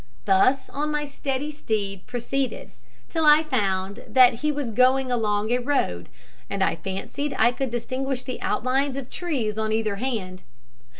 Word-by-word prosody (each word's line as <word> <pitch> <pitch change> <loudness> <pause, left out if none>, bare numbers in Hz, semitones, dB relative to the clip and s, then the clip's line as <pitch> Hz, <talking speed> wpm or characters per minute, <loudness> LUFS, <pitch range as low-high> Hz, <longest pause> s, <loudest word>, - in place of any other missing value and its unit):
Thus 255 +8 +3
on 300 +2 -2
my 295 0 -1
steady 280 0 -3
steed 205 -9 -3
proceeded, 250 +1 -3 0.4
till 325 - -1
I 300 +1 +7
found 200 -7 -1
that 255 -2 +6
he 300 0 +2
was 285 -5 -3
going 255 +2 +3
along 215 -2 0
a 245 - +3
road, 240 - -1 0.4
and - - 0
I - - +2
fancied 195 - -4
I 240 - +5
could 265 +1 -3
distinguish 255 +2 -3
the 255 - -6
outlines 265 +2 0
of 270 -2 -6
trees 245 - -2
on 220 0 -1
either 215 -2 0
hand. 200 -7 -3
255 Hz, 160 wpm, -24 LUFS, 215-275 Hz, 0.4 s, I